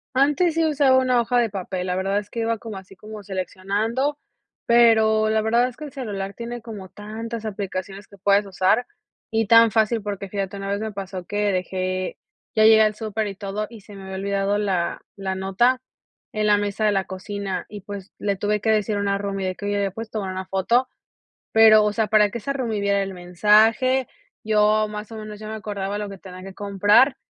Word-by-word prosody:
Antes 295 +5 +3
sí 330 0 +2
usaba 285 -4 +4
una 255 -2 +3
hoja 245 +2 0
de 230 -3 +2
papel, 185 -2 -4
la 180 0 -1
verdad 195 +2 0
es 205 0 -4
que 235 - -4
iba 230 0 0
como 220 -2 -8
así 190 0 -12
como 215 +2 -10
seleccionando, 205 - -2 0.5
pero 220 -2 +5
la 220 0 +2
verdad 235 +3 +3
es 250 - -10
que 305 - -7
el 290 - -9
celular 200 -8 -5
tiene 235 +2 -6
como 210 -5 -8
tantas 220 +3 -7
aplicaciones 195 -1 -5
que 200 - -16
puedes 200 +2 +3
usar 190 +6 +1 0.4
y 225 0 +1
tan 230 +1 +7
fácil 220 +1 +1
porque, 200 -1 -5
fíjate, 195 0 -4
una 195 - -5
vez 200 0 -1
me 220 0 -3
pasó 190 -2 -6
que 205 +2 0
dejé 185 0 -2 0.4
ya 215 - +4
llegué 220 0 +7
al 215 -1 +3
súper 215 0 -3
y 195 - -6
todo 200 +2 -4
y 230 -3 -12
se 205 - -14
me 195 - -10
había 190 0 -7
olvidado 200 +1 0
la 190 -4 -1 0.2
la 190 -1 -3
nota 195 +7 +2 0.5
en 215 0 0
la 205 0 +5
mesa 205 +1 -1
de 210 - +4
la 195 -1 +1
cocina 195 0 -5
y, 205 -1 -8
pues, 200 0 -8
le 200 -1 -1
tuve 210 +2 -1
que 220 - +2
decir 210 -1 +1
una 200 0 0
roomie 195 -1 -3
de 185 - -3
que: 205 - -6
"Oye, 205 0 0
¿le 200 -1 0
puedes 225 +3 -7
tomar 190 -4 -4
foto?", 235 +7 +2 0.7
pero, 220 -1 +7
o 210 - +1
sea, 215 -1 0
para 210 -1 +4
que 235 - -4
esa 255 +5 -3
roomie 235 -6 -2
viera 200 0 +1
el 195 0 -7
mensaje, 215 +8 +3 0.4
yo, 215 0 +3
más 210 +1 -7
o - - -7
menos, 215 -1 -8
ya 215 - -9
me 220 - -5
acordaba 205 -2 -4
lo 210 -1 -4
que 195 - -9
tenía 185 -1 -11
que 195 0 -9
comprar 205 +7 +3
210 Hz, 215 wpm, -23 LUFS, 195-225 Hz, 0.7 s, tan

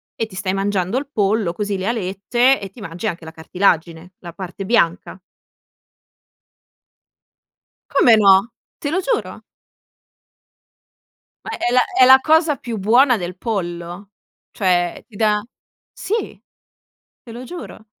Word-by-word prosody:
e 225 - -2
ti 200 -4 -14
stai 185 0 -2
mangiando 195 +2 -1
il 280 0 -3
pollo 205 -4 0
così, 205 0 -3
le 190 +2 -4
alette, 235 +5 +1
e 195 - -6
ti 210 - -17
mangi 180 +3 -5
anche 170 -4 -5
la 160 - -9
cartilagine, 170 0 -1
la 170 -2 -10
parte 190 +1 -7
bianca. 190 -3 0 2.7
Come 235 -3 +5
no? 200 +2 +5 0.3
Te 290 - -3
lo 370 - 0
giuro. - - -3 2.0
Ma - - -5
è 240 - -1
la 250 - +5
è 255 - +4
la 265 +1 +8
cosa 315 -1 +3
più 235 -3 -6
buona 240 +5 +4
del 180 -1 -6
pollo, 180 -2 -5 0.4
cioè 175 -3 0
ti 210 -5 -15
dà 210 -2 +1 0.5
sì, 445 +4 -4 0.8
te 235 - -14
lo 240 +2 -8
giuro, 335 -9 -10
205 Hz, 135 wpm, -19 LUFS, 185-240 Hz, 2.7 s, la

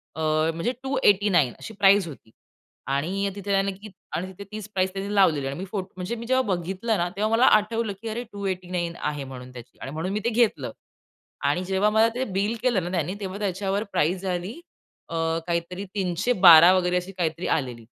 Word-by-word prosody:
अ, - - -7 0.3
म्हणजे 170 +9 -1
289 205 - +3
अशी 225 - -8
प्राईस 200 -2 +4
होती. 135 -7 -12 0.6
आणि 180 +9 -1
तिथे 200 0 -5
त्याने 195 0 +2
की 200 +3 -11 0.3
आणि 175 +4 -2
तिथे 190 +1 -10
तीच 215 -1 -6
प्राईस 185 0 +1
त्यांनी 195 +1 -4
लावलेली 160 -8 +3
आहे - - -1
आणि - - -8
मी 190 - -4
फोट 190 -3 -3
म्हणजे 185 +5 -4
मी 235 0 -7
जेव्हा 260 +2 +3
बघितलं 190 +6 -2
ना 175 0 0
तेव्हा 210 +2 0
मला 230 +3 +4
आठवलं 215 0 -2
की 230 - -6
अरे 230 +3 -3
289 185 -3 -3
आहे 145 -2 -3
म्हणून 130 -1 -9
त्याची. 120 -1 -12
आणि 135 - -6
म्हणून 160 +5 -3
मी 210 - 0
ते - - +3
घेतलं. 235 -1 +1 0.7
आणि 180 - +1
जेव्हा 190 +3 +2
मला 220 +1 +5
ते 255 - -1
बिल 200 +2 -1
केलं 240 -8 +2
ना 175 - -4
त्यानी, 175 +1 -1
तेव्हा 195 -1 -5
त्याच्यावर 195 0 -1
प्राईस 180 +5 +1
झाली 185 +1 -3 0.6
अ, - - -7 0.3
काहीतरी 175 +3 -2
312 180 -2 +6
वगैरे 180 -1 +1
अशी 180 +2 -4
काहीतरी 165 -1 -1
आलेली. 125 -5 -6
190 Hz, 195 wpm, -25 LUFS, 175-205 Hz, 0.7 s, 312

